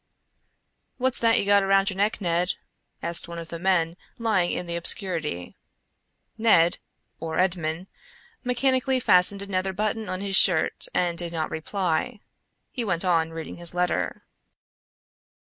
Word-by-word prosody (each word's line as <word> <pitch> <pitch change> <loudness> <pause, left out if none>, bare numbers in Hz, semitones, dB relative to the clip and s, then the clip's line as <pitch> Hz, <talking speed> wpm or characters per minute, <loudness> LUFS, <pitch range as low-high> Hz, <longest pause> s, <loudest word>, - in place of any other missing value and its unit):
"What's 260 0 +1
that 230 -1 +4
you - - +1
got 200 0 +5
around 195 +1 +3
your 190 - -8
neck, 205 +2 0
Ned?" 175 -1 0 0.5
asked 170 0 0
one 170 0 -8
of 165 -1 -8
the 170 - -6
men 170 -2 +1 0.2
lying 210 -7 +1
in 180 - -3
the 170 0 -4
obscurity. 170 - -1 0.8
Ned—or 165 -5 0
Edmond—mechanically 235 - -1
fastened 195 -2 +4
another 190 -1 -2
button 215 +1 -2
of 185 0 -3
his 195 0 -1
shirt 175 -5 +3
and 175 -1 +1
did 170 -1 +1
not 160 -2 -3
reply. 185 +6 -2 0.5
He 245 - -3
went 185 -4 -1
on 165 -3 +2
reading 165 -1 -7
his 175 0 +1
letter. 180 0 -1
185 Hz, 135 wpm, -25 LUFS, 170-205 Hz, 0.8 s, got